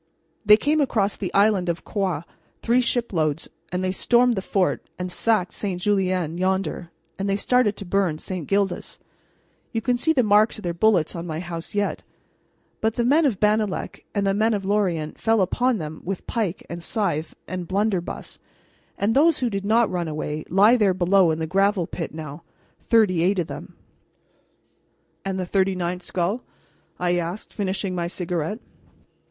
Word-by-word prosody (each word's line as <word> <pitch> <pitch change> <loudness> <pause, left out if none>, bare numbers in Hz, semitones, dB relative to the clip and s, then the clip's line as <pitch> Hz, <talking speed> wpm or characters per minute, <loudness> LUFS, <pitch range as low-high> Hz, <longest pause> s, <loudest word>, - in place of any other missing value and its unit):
They 210 0 +7
came 300 +5 +1
across 210 -7 +1
from 195 - -3
the - - -8
island 200 -3 +3
of 170 0 -2
Groix 185 -7 -1 0.4
three 240 +2 +3
shiploads, 175 - -1 0.2
and 180 +1 -2
they 185 - 0
stormed 240 +5 +3
the 195 - -2
fort 190 -1 0
and 180 0 -4
sacked 210 -3 +1
St. 190 -4 -3
Julien 185 -4 0
yonder, 185 -2 -1 0.3
and 195 +1 -1
they 195 - +2
started 215 0 +2
to 200 - -7
burn 185 -4 +1
St. 175 -1 -5
Gildas 195 -2 -1 0.7
you 225 - -1
can 245 +2 0
see 320 +6 +2
the 260 -6 +3
marks 210 +2 +4
of 215 - -10
their 175 -1 -1
bullets 180 -3 +2
on 170 +1 -5
my 160 -1 -3
house 170 0 -6
yet; 205 0 0 0.8
but 220 0 0
the 240 - 0
men 300 +6 +4
of 215 -8 -1
Bannalec 210 -1 0
and 200 -1 +1
the 195 - +2
men 215 +2 +2
of 195 -2 -4
Lorient 185 -7 0
fell 225 0 +2
upon 245 +6 +1
them 155 -3 -6
with 195 0 -4
pike 210 -6 -2
and 170 +1 -6
scythe 170 -6 -2
and 180 -2 -5
blunderbuss, 195 -2 -2 0.6
and 205 +3 +1
those 310 +2 +5
who 245 -3 -1
did 200 0 -3
not 225 +2 +4
run 175 -2 -2
away 155 0 -4
lie 205 +7 +5
there 200 -5 +3
below 185 0 +4
in 160 - 0
the 160 - -2
gravel 195 +2 +2
pit 165 0 -5
now 155 0 -8 0.5
thirty 210 -7 +4
eight 190 +4 +2
of 175 - +1
them." - - -9 1.5
"And 190 -1 -3
the 185 - -2
thirty 190 +1 +1
ninth 180 0 -2
skull?" 185 +7 -1 0.6
I 180 0 +1
asked, 175 +4 -4
finishing 195 -1 -2
my 175 -1 -2
cigarette. 175 +1 -3
195 Hz, 180 wpm, -23 LUFS, 175-215 Hz, 1.5 s, They